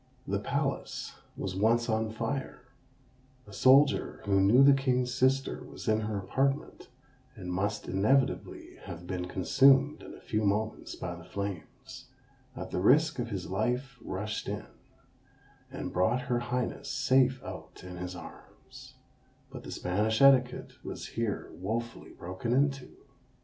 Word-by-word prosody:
The - - 0
palace - - -3 0.2
was 95 -1 -4
once 115 +4 +2
on 110 -1 0
fire; 115 +5 -4 0.8
a 105 - -14
soldier, 135 +6 +4
who 100 -1 +3
knew 115 +8 +6
the 140 0 +8
king's 130 -2 +1
sister 130 +2 +1
was - - -10
in 110 0 +3
her 110 -1 -2
apartment, 135 +9 -1 0.5
and 90 -5 -6
must 100 +3 -2
inevitably 130 +8 0
have 85 +1 -8
been 90 0 -3
consumed 135 +10 +4
in - - -10
a - - -13
few 110 0 -2
moments 105 +2 -1
by 85 - -5
the 85 -1 -10
flames, 100 +9 -7 0.5
at - - -6
the - - -1
risk 150 - +4
of 120 -1 -2
his 95 -4 -4
life 125 +5 -1
rushed 105 +3 -4
in, - - -4 1.0
and - - -6
brought 110 +8 +2
her 125 -1 -1
highness 120 +1 -3
safe 130 -1 +3
out - - -9
in 90 -1 -8
his 90 +1 -5
arms: 85 - -13 0.6
but - - -8
the - - -10
Spanish 105 +5 0
etiquette 130 -3 +3
was - - -6
here 115 -3 -3
wofully 115 +5 -4
broken 95 +7 -4
into! 135 0 +1
115 Hz, 145 wpm, -30 LUFS, 100-130 Hz, 1.0 s, the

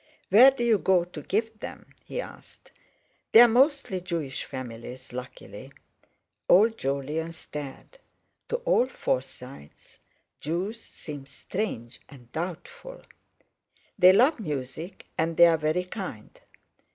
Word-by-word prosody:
"Where 235 +8 +9
do 270 -3 -3
you 225 -3 +3
go 185 -2 +3
to 175 -3 -9
give 220 +6 -2
them?" - - -9
he - - -5
asked. - - -13 0.6
"They're 240 +2 +10
mostly 255 - +2
Jewish 165 -7 -4
families, 125 -2 -8
luckily." 125 -1 -9 0.8
Old 220 +5 +5
Jolyon 145 +5 -2
stared; 150 - -9 0.5
to - - 0
all - - +3
Forsytes 130 - -6 0.4
Jews 185 +9 -3
seem 145 -9 -10
strange 135 - -5
and 120 -4 -16
doubtful. 475 - -7 1.0
"They 180 0 +9
love 255 +9 +4
music, 150 - -6
and 165 +1 0
they're 170 -1 +7
very 155 +3 0
kind." 180 - -7
170 Hz, 115 wpm, -27 LUFS, 135-220 Hz, 1.0 s, They're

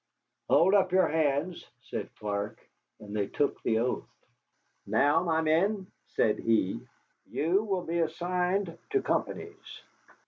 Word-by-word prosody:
"Hold 185 +4 +5
up 190 -3 +4
your 185 0 +4
hands," 155 +2 0 0.2
said - - -5
Clark, 105 0 -3 0.4
and 105 0 -8
they 100 -2 0
took 145 - -1
the 110 - +1
oath. 125 +2 -1 0.8
"Now, 145 +1 +3
my 160 -2 +1
men," 185 +6 +2 0.2
said 105 - +1
he, 110 -4 +1 0.5
"you 170 +7 +2
will 190 -4 -1
be 170 +1 -1
assigned 180 +2 -1
to 405 -2 +1
companies. 420 0 -3
165 Hz, 130 wpm, -29 LUFS, 130-185 Hz, 0.8 s, Hold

